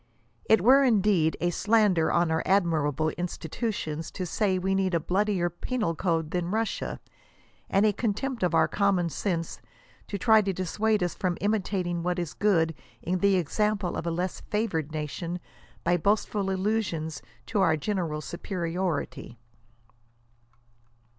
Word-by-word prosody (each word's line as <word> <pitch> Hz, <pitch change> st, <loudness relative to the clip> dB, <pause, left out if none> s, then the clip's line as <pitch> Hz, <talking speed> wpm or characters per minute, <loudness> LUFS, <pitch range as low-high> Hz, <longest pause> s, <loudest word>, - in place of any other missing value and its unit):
It 220 Hz, -, +4 dB
were 265 Hz, +7 st, +6 dB
indeed 200 Hz, -9 st, +3 dB
'*a 175 Hz, 0 st, +1 dB
slander 205 Hz, -4 st, +3 dB
on 170 Hz, -1 st, +2 dB
our 160 Hz, -, +1 dB
admirable 160 Hz, -5 st, +1 dB
institutions," 165 Hz, -1 st, -4 dB
to 185 Hz, -, -5 dB
say 190 Hz, +2 st, 0 dB
we 190 Hz, +1 st, 0 dB
need 190 Hz, -2 st, +1 dB
a -, -, +3 dB
bloodier 185 Hz, +1 st, +1 dB
penal 175 Hz, +2 st, -2 dB
code 165 Hz, -2 st, -1 dB
than 175 Hz, -1 st, -1 dB
Russia; 220 Hz, +2 st, -2 dB, 0.7 s
and 195 Hz, +2 st, +3 dB
a 210 Hz, -, +3 dB
contempt 235 Hz, +4 st, -2 dB
of 175 Hz, -2 st, +1 dB
our 160 Hz, -1 st, +4 dB
common 190 Hz, -3 st, +1 dB
sense," 165 Hz, +1 st, -3 dB, 0.5 s
to 200 Hz, -, -3 dB
try 220 Hz, +2 st, +5 dB
to 195 Hz, -2 st, -1 dB
dissuade 205 Hz, +3 st, 0 dB
us 175 Hz, -, -1 dB
from 180 Hz, -2 st, -2 dB
imitating 190 Hz, -4 st, -1 dB
what 180 Hz, +1 st, -1 dB
is 175 Hz, -4 st, -3 dB
good 165 Hz, -6 st, +2 dB, 0.3 s
in 180 Hz, +2 st, -1 dB
the 200 Hz, 0 st, +4 dB
example 200 Hz, +2 st, 0 dB
of 170 Hz, -, -4 dB
a -, -, +2 dB
less 175 Hz, +2 st, -2 dB
favored 170 Hz, -9 st, -2 dB
nation, 160 Hz, +3 st, -4 dB, 0.4 s
by 175 Hz, +1 st, +3 dB
boastful 200 Hz, +2 st, 0 dB
allusions 190 Hz, -6 st, -1 dB, 0.2 s
to 210 Hz, -3 st, 0 dB
our 165 Hz, -4 st, +3 dB
general 165 Hz, -3 st, -2 dB
superiority. 170 Hz, -6 st, -3 dB
180 Hz, 145 wpm, -27 LUFS, 165-205 Hz, 0.7 s, were